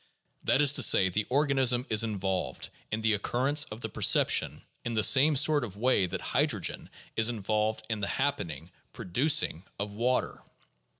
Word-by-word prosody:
That 145 - +2
is 140 -1 +4
to 145 - +2
say, 95 -5 +4
the 105 +3 -3
organism 130 -3 +1
is 110 +1 +3
involved 100 -4 -4 0.2
in 110 +1 -3
the 110 0 +1
occurrence 130 +8 0
of 110 +2 -11
the - - -3
perception - - +2 0.2
in 120 -1 -4
the 110 - +1
same 145 +6 +5
sort 145 0 +3
of 100 -4 -8
way 115 -5 +1
that - - -6
hydrogen - - -1 0.3
is 110 +1 +2
involved 110 0 -2
in 110 -2 -3
the 100 - -2
happening 90 - -3
— - - -39
producing 130 - 0
— - - -40
of 100 0 -5
water. 125 +4 -2
115 Hz, 175 wpm, -28 LUFS, 105-135 Hz, 0.3 s, same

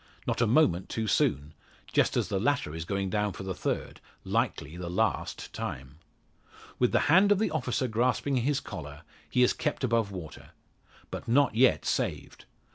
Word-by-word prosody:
Not - - -1
a 115 - +4
moment 105 - +3
too 110 - -2
soon 75 -7 +1 0.4
just - - +2
as - - +1
the 100 -3 -1
latter 130 - 0
is 80 0 -5
going 95 0 -2
down 105 -2 0
for 95 - -8
the 95 0 -3
third - - -3 0.2
likely 75 +3 -1
the 90 -1 -5
last 90 - -1
time. 65 +4 -6 0.8
With 125 - +3
the - - +3
hand 190 +6 +5
of 205 - +5
the 220 - 0
officer 130 -4 -1
grasping 125 +4 +1
his 135 +3 +1
collar, 75 - -8 0.3
he 125 - +3
is 125 - +4
kept 150 -3 -3
above 115 -4 +1
water. 90 -6 -9 0.6
But - - -6
not 140 +3 +3
yet 125 +4 +3
saved. - - -2
110 Hz, 175 wpm, -29 LUFS, 90-130 Hz, 0.8 s, hand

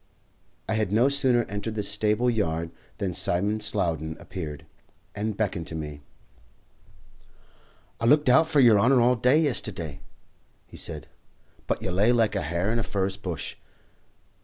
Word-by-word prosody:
I - - -1
had 110 -3 0
no 115 +6 +4
sooner 130 -4 +3
entered 105 +1 -5
the 105 - -2
stable 105 +4 +1
yard 85 -8 -1 0.3
than 95 -3 -2
Simon 100 +6 0
Slowden 80 -7 -1
appeared, 80 -6 -7 0.5
and 105 0 -3
beckoned 100 -6 -2
to 80 - -6
me. 75 -2 -6 2.0
"I 115 - -2
looked 150 +4 +4
hout 160 +6 +5
for 155 -2 +2
yer 115 -6 +6
honour 125 +5 +4
all 125 +1 +4
day 125 +5 +3
yesterday," 90 - -2 0.6
he - - -15
said, - - -4 0.6
"but - - -2
you 95 - -2
lay 100 +6 +3
like 115 -3 +2
a 100 - 0
hare 85 +6 -1
in 115 - 0
a - - 0
furze 95 -1 -2
bush. 90 -6 -6
105 Hz, 155 wpm, -26 LUFS, 90-120 Hz, 2.0 s, yer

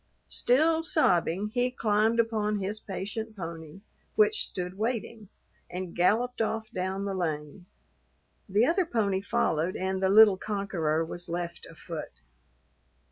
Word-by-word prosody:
Still 320 +6 +3
sobbing, 200 - +2
he 245 +3 +1
climbed 220 -1 +1
upon 215 -2 +1
his 200 +2 -2
patient 215 +3 -5
pony, 165 0 -7 0.3
which 430 0 +3
stood 180 0 -5
waiting, 220 -1 -3 0.4
and 180 -1 -6
galloped 230 +8 +2
off 220 0 -2
down 190 +2 -2
the 200 - -2
lane. 165 0 -4 0.8
The 205 +5 +4
other 345 +3 +2
pony 200 - 0
followed 170 -3 0
and 190 0 -2
the 190 - +3
little 205 -1 +7
conqueror 180 -7 -1
was 175 +2 -6
left 170 0 -4
afoot. 160 - -8
200 Hz, 130 wpm, -28 LUFS, 175-225 Hz, 0.8 s, little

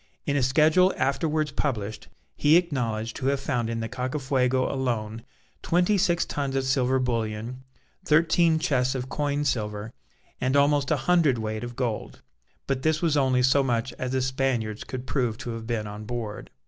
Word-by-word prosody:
In 140 - 0
a 140 - +2
schedule 155 +8 +4
afterwards 150 +3 0
published, 110 -7 -3 0.3
he 150 +3 +5
acknowledged 115 -10 -1
to 130 - -2
have 140 0 +1
found 120 -4 -1
in 115 0 -2
the 115 - -2
Cacafuego 130 0 0
alone 115 -4 -2 0.4
twenty 180 +4 +2
six 175 -3 +2
tons 140 -2 -3
of 135 - +1
silver 130 -1 +2
bullion, 115 0 -2 0.4
thirteen 165 0 +3
chests 130 -5 +1
of 130 0 -4
coined 145 0 -1
silver, 105 -3 -2 0.5
and 130 +2 +1
almost 140 -1 +3
a - - +2
hundredweight 120 -11 +2
of 120 0 -6
gold. 120 -4 -4 0.4
But 135 -1 -1
this 155 +2 +1
was 160 -3 +2
only 130 -3 +3
so 130 +2 +4
much 120 -2 -1
as 130 0 -3
the 130 -1 +1
Spaniards 130 -5 -1
could 130 0 -6
prove 125 -6 -1
to 120 - -5
have 115 -1 -6
been 115 -3 -2
on 105 +1 -7
board. 110 -3 -5
130 Hz, 170 wpm, -26 LUFS, 115-145 Hz, 0.5 s, he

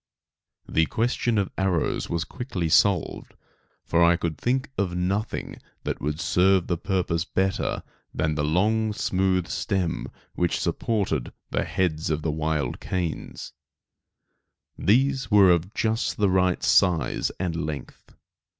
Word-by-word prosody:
The 80 -1 +2
question 120 0 0
of 100 -2 0
arrows 95 -4 0
was 85 -1 -1
quickly 95 -6 -4
solved, 95 0 +2 0.5
for 85 +1 +3
I 85 +1 +5
could 85 -2 -2
think 130 - -1
of 90 -3 -1
nothing 95 +5 -2 0.2
that - - -3
could 75 +2 -3
serve 95 -1 +3
the 90 - 0
purpose 90 -3 0
better 95 +1 -1 0.3
than 80 0 0
the 75 -1 -1
long 105 +8 +1
smooth 95 -3 0
stem 90 -4 -2 0.3
which 90 -1 0
supported 95 - -1 0.2
the - - 0
heads 80 -4 -1
of 75 -1 -1
the 80 - 0
wild 75 -4 -1
canes 90 -4 -4 1.2
These 135 +5 +2
were 100 -4 +7
of 85 +2 +1
just 110 +1 0
the 100 -3 +2
right 90 -1 +2
size 90 -1 +3
and 90 -3 -2
length. 75 -2 -7
90 Hz, 130 wpm, -25 LUFS, 80-100 Hz, 1.2 s, were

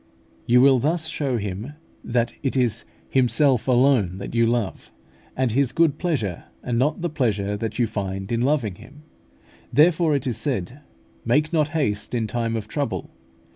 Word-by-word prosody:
You 125 +1 +5
will 135 -1 +6
thus 160 +5 0
show 140 -6 -1
Him 105 +6 -5 0.3
that 120 0 0
it 135 -2 -1
is 120 -3 0 0.3
Himself 130 0 +3
alone 125 -8 +3
that 100 +3 -7
you 115 -1 +3
love, 115 -4 -2 0.5
and 130 -2 +1
His 135 +2 +2
good 160 -3 +2
pleasure, 120 - -2 0.2
and 120 -1 -1
not 150 +5 +1
the 175 - 0
pleasure 105 -8 0
that 110 0 -4
you 120 - +3
find 95 -2 -4
in 115 0 0
loving 130 -6 +1
Him. 145 +7 -15 0.7
Therefore 160 0 +4
it 140 - -2
is 125 -4 -1
said, 125 - -3 0.4
"Make 150 +7 +1
not 155 -3 +3
haste 105 -5 -1
in 115 -2 0
time 115 0 -2
of 110 -2 -4
trouble. 140 +5 -3
125 Hz, 170 wpm, -23 LUFS, 110-145 Hz, 0.7 s, will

